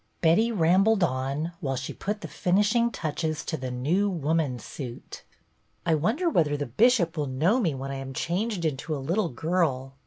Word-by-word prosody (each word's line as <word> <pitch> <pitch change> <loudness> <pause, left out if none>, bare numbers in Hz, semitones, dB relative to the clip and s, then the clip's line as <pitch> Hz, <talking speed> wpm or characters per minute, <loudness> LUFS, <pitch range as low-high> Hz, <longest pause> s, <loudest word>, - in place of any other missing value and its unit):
Betty 180 +9 +3
I'ambled 195 +2 +3
on 140 +2 -1
while 135 -3 -2
she 130 0 -4
put 210 +1 -4
the - - -5
finish 205 +4 +1
insi 235 -1 +3
touches 155 -1 -3
to 160 - -2
The 130 -4 -4
New 155 +12 +1
Woman's 155 - -1
suit. 125 -4 -8 0.3
" - - -42
I 165 - +3
wonder 220 - +1
whether 155 - +2
the 145 - -2
Bishop 175 - +3
will 150 -2 -1
know 160 - +2
me 170 - 0
when 135 +1 -5
I 135 - -4
am 135 0 -6
changed 190 +1 -1
into 155 +1 -2
a - - -3
little 180 +3 +1
girl." 135 -2 -1
160 Hz, 190 wpm, -27 LUFS, 135-195 Hz, 0.3 s, Betty